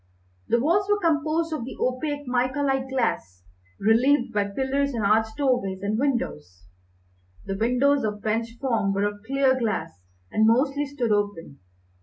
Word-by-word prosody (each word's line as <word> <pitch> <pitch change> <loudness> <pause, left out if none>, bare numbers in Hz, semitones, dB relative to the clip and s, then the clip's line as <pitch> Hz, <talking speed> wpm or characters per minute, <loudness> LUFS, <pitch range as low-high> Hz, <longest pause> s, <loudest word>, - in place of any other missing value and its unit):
The 235 - +2
walls 350 +10 +2
were 415 0 +3
composed 320 -1 0
of 305 - -3
the 255 - -8
opaque 290 +3 -2
mica 255 +3 0
like 270 -1 0
glass, 95 - -2 0.4
relieved 240 +4 +3
by 205 -1 +1
pillars 265 +6 -1
and 220 -3 -1
arched 220 +3 +2
doorways 245 -9 0
and 210 +2 -1
windows. 90 - -2 0.8
The 195 - -3
windows, 250 +6 +2
of 210 -1 -3
French 225 +2 -2
form, 230 -7 0
were 200 - 0
of 205 0 -2
clear 270 -1 +2
glass, 215 - -3 0.3
and 220 0 +3
mostly 275 +5 +2
stood 260 -5 -2
open. 205 -8 -2
245 Hz, 155 wpm, -25 LUFS, 210-280 Hz, 0.8 s, were